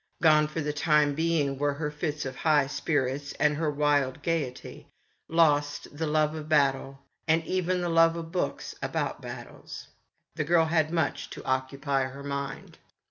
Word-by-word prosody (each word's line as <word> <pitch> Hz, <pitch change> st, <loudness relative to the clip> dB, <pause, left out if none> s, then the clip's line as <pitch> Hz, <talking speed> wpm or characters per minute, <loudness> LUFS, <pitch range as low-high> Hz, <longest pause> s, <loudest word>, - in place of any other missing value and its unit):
Gone, 155 Hz, -2 st, +5 dB
for 155 Hz, +2 st, -4 dB
the 150 Hz, 0 st, -2 dB
time 150 Hz, -1 st, +3 dB
being, 150 Hz, -3 st, 0 dB
were 145 Hz, -1 st, +1 dB
her 150 Hz, 0 st, -3 dB
fits 150 Hz, -1 st, -3 dB
of 130 Hz, -1 st, -5 dB
high 150 Hz, -1 st, +3 dB
spirits 140 Hz, -1 st, -1 dB
and 150 Hz, 0 st, +2 dB
her 155 Hz, 0 st, 0 dB
wild 145 Hz, -2 st, +1 dB
gaiety; 155 Hz, -7 st, -3 dB, 0.4 s
lost, 145 Hz, -3 st, +1 dB
the 160 Hz, +1 st, -2 dB
love 155 Hz, 0 st, +2 dB
of 155 Hz, -1 st, -7 dB
battle, 135 Hz, -2 st, +1 dB, 0.2 s
and 160 Hz, +1 st, +2 dB
even 185 Hz, 0 st, 0 dB
the 175 Hz, -, -1 dB
love 165 Hz, 0 st, +4 dB
of 165 Hz, -1 st, -6 dB
books 180 Hz, -, -2 dB
about -, -, -2 dB
battles. -, -, -9 dB, 0.4 s
The 155 Hz, -, -2 dB
girl 165 Hz, +2 st, +3 dB
had 160 Hz, -1 st, +1 dB
much 165 Hz, -1 st, -1 dB
to -, -, -9 dB
occupy 135 Hz, +1 st, 0 dB
her 135 Hz, +2 st, -8 dB
mind. 140 Hz, -1 st, -5 dB
150 Hz, 165 wpm, -28 LUFS, 140-160 Hz, 0.4 s, Gone